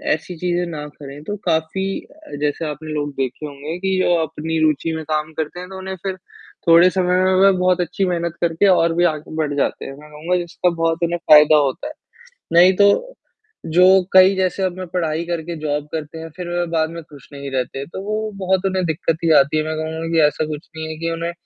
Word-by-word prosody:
ऐसी 160 +3 -9
चीज़ें 175 +1 -1
ना 150 -2 -6
करें, 145 0 -11
तो 205 +6 -5
काफ़ी 160 +3 0 0.2
अ, 315 - -13
जैसे 150 +2 -1
आपने 155 +1 -7
लोग 145 -1 -2
देखे 135 +2 -3
होंगे 145 +3 -6
कि 190 0 0
जो 175 - +3
अपनी 160 +1 -3
रुचि 155 +1 +1
में 160 - -5
काम 155 0 -2
करते 155 +3 -4
हैं, 180 +1 -8
तो 190 - -8
उन्हें 190 0 -6
फिर 190 -1 -2 0.5
थोड़े 170 +2 +7
समय 180 0 +1
में 185 0 +3
वह 195 +1 +6
बहुत 180 0 +2
अच्छी 180 +3 -1
मेहनत 170 -2 -1
करके 170 +3 +2
और 170 -3 +4
भी 175 +1 +1
आगे 155 +1 -10
बढ़ 150 -2 -1
जाते 140 - -1
हैं, 135 - -7
मैं 150 0 -14
कहूँगा 165 +4 -1
जिसका 175 +1 -1
बहुत 165 0 -1
उन्हें 170 +1 0
फ़ायदा 150 -2 +7
होता 145 - 0
है, 305 - -8 0.6
नहीं 180 +2 +7
तो - - +3 0.6
जो 180 - +6 0.3
कई 190 +1 +7
जैसे 190 0 -1
अब 185 -1 -2
मैं 185 - -5
पढ़ाई 165 -2 -1
करके 170 0 -4
जॉब 150 -1 -2
करते 155 0 -5
हैं 165 0 -8
फिर 180 -1 -5 0.2
बाद 160 -1 +1
में 170 0 -7
खुश 145 -4 -16
नहीं 140 0 -7
रहते, 135 +1 -3
तो 170 +5 -8
वो 215 +1 -3
बहुत 190 0 0
उन्हें 190 -1 0
दिक्कत 160 0 -1
ही 165 - +3
आती 140 +3 +1
है, 155 - +1
मैं 155 0 -3
कहूँगा 160 +1 -4
कि 165 - +3
ऐसा 150 +1 -2
कुछ 150 0 -7
नहीं 160 0 -5
है 160 - -5
कि 165 0 -2
उन्हें 165 +1 -3
165 Hz, 225 wpm, -20 LUFS, 155-180 Hz, 0.6 s, थोड़े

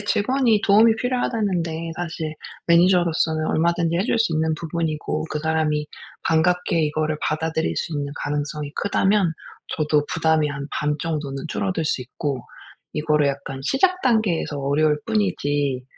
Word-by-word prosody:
직원이 225 +2 +2
도움이 220 +3 +6
필요하다는데 190 -10 -1
사실 160 -2 -4 0.3
매니저로서는 170 -2 +3
얼마든지 170 0 +1
해 185 - +2
줄 230 - +1
수 225 -6 +2
있는 160 0 +1
부분이고 155 -1 -2
그 150 - -2
사람이 155 -1 0 0.4
반갑게 170 0 +2
이거를 155 0 -1
받아들일 160 +1 -1
수 165 - -2
있는 145 -1 -3
가능성이 145 0 -3
크다면 195 -3 +2 0.4
저도 150 -1 +2
부담이 160 -2 +2
한 140 0 -5
반 150 0 0
정도는 150 -4 -3
줄어들 180 -3 -1
수 150 - 0
있고 130 +1 -4 0.5
이거를 150 -1 +2
약간 135 -1 -5
시작 365 - +2
단계에서 215 - +1
어려울 150 +2 +2
뿐이지 145 - 0
160 Hz, 340 characters per minute, -23 LUFS, 150-180 Hz, 0.5 s, 도움이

